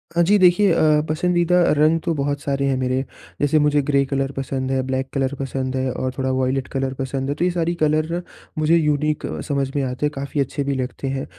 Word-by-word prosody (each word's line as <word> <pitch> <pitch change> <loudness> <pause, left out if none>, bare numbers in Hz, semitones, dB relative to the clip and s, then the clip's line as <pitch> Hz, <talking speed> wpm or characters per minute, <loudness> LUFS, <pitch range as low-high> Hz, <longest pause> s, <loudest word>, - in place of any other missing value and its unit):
हाँ 170 - +4
जी। 205 +4 +4
देखिए 185 +2 +5
अ, 155 -2 +3
पसंदीदा 175 +2 +2 0.2
रंग 155 +2 +4
तो 170 - +1
बहुत 145 0 -1
सारे 140 -1 -1
हैं 135 -1 +1
मेरे, 130 0 0 0.4
जैसे 145 +2 +3
मुझे 150 0 +3
ग्रे 140 -1 +3
कलर 135 0 -1
पसंद 130 0 -2
है, 130 -1 +1
ब्लैक 130 0 -2
कलर 135 -1 0
पसंद 135 -1 -3
है 130 0 -1
और 130 +1 -3
थोड़ा 130 -1 -1
वॉयलेट 130 0 0
कलर 135 -1 -2
पसंद 135 0 -3
है, 145 - -1
तो 165 - -2
ये 180 - +3
सारी 170 -1 0
कलर 155 +3 +1 0.4
मुझे 155 +2 +3
यूनिक 150 -1 0
अ, - - -4
समझ 140 -3 -1
में 140 - +1
आते 130 +3 -2
हैं 150 - 0
काफ़ी 140 +2 -4
अच्छे 140 +1 -2
भी 140 0 -1
लगते 130 +1 -4
हैं। 135 0 -2
140 Hz, 225 wpm, -21 LUFS, 135-155 Hz, 0.4 s, देखिए